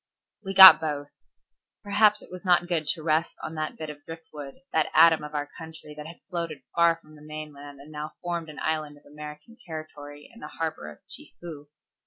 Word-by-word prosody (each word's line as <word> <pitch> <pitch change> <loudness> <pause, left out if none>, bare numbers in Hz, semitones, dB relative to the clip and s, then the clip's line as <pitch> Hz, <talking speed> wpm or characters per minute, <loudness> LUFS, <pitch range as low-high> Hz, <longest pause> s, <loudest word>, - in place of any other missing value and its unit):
We 195 -1 -5
got 190 -3 +12
both. 145 -2 -3 0.7
Perhaps 210 +1 +3
it - - -16
was 180 +1 -9
not 175 -2 +3
good 165 -4 -1
to 160 - -1
rest 160 +1 0
on 160 - -5
that 155 -1 -4
bit 155 -1 -6
of 145 -1 -15
drift 165 0 -10
wood, 145 -2 -8 0.2
that 160 - +2
atom 160 -1 +6
of 150 0 -8
our 145 0 -1
country 160 -2 -11
that 150 0 -9
had 165 - -12
floated 170 -6 -5
far 170 0 +4
from 155 -2 -19
the 150 - -16
mainland 150 -2 -9
and 145 +2 -13
now 150 0 -6
formed 170 -2 -3
an 150 - -11
island 155 -2 -2
of - - -23
American 150 +8 -11
territory 150 -3 -9
in 230 - -15
the - - -8
harbor 160 - -4
of 75 - -16
Chefoo. 155 -4 -9
155 Hz, 205 wpm, -26 LUFS, 150-170 Hz, 0.7 s, got